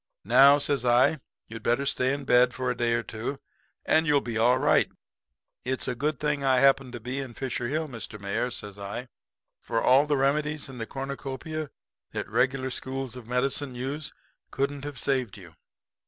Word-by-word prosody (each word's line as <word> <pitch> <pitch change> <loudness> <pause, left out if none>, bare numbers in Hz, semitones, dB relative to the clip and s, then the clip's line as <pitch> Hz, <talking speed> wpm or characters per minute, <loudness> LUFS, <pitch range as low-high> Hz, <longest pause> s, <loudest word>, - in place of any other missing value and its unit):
"'Now,' 135 +7 +7
says 145 -3 +1
I, 125 +5 +4 0.3
'you'd 115 0 -8
better 120 +5 +1
stay 130 -1 +1
in 140 0 -3
bed 125 0 +4
for 130 -1 -1
a - - -3
day 120 -1 +1
or 120 - -1
two, 115 +6 -5 0.5
and 160 +1 +3
you'll 145 -1 +4
be 120 -4 -5
all 120 +3 +4
right. - - +3 0.7
It's 130 +1 -2
a 125 - 0
good 145 +3 -2
thing 150 -2 -1
I 130 -1 +4
happened 135 -1 +3
to 120 - -5
be 125 +4 -4
in 130 -4 -6
Fisher 125 -2 -3
Hill, 155 +4 -1
Mr. 115 -4 -7
Mayor,' 100 +5 -1
says 105 -4 -7
I, 110 +5 -6 0.5
'for 115 - -1
all 135 +5 +5
the 145 -1 +2
remedies 150 +2 0
in 130 -2 -9
the 115 - -4
cornucopia 140 +4 -5 0.4
that - - -3
the - - -19
regular 130 0 +1
schools 130 -1 -4
of 125 -3 -10
medicine 130 +2 -1
use 135 +5 -4 0.4
couldn't 140 +1 -2
have 145 -2 -6
saved 130 -7 -1
you. 90 -4 -13
130 Hz, 190 wpm, -27 LUFS, 120-140 Hz, 0.7 s, Now